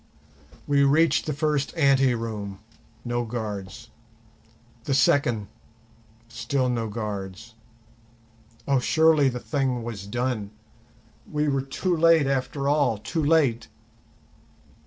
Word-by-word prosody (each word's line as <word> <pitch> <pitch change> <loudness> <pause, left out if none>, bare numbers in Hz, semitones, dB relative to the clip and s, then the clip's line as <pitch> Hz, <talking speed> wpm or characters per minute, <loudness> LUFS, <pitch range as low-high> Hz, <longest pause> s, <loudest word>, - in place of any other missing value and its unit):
We 140 -1 +3
reached 155 +5 +3
the - - 0
first 150 +1 -1
ante 135 -4 +4
room—no 115 +2 -6
guards; 110 -1 -6 1.0
the 135 - 0
second, 120 -7 +2 0.8
still 120 +3 -1
no 115 -2 -1
guards. 105 0 -6 1.1
Oh, 140 -2 +3
surely 160 0 +3
the 125 -1 -5
thing 130 -4 -2
was 105 -4 -7
done! 120 -2 -2 0.8
we 150 0 0
were 135 -2 +1
too 155 +7 -2
late 165 -2 +4
after 135 +1 -2
all, 145 -6 +2
too 155 +10 -3
late! 145 -7 +2
125 Hz, 105 wpm, -25 LUFS, 115-145 Hz, 1.1 s, ante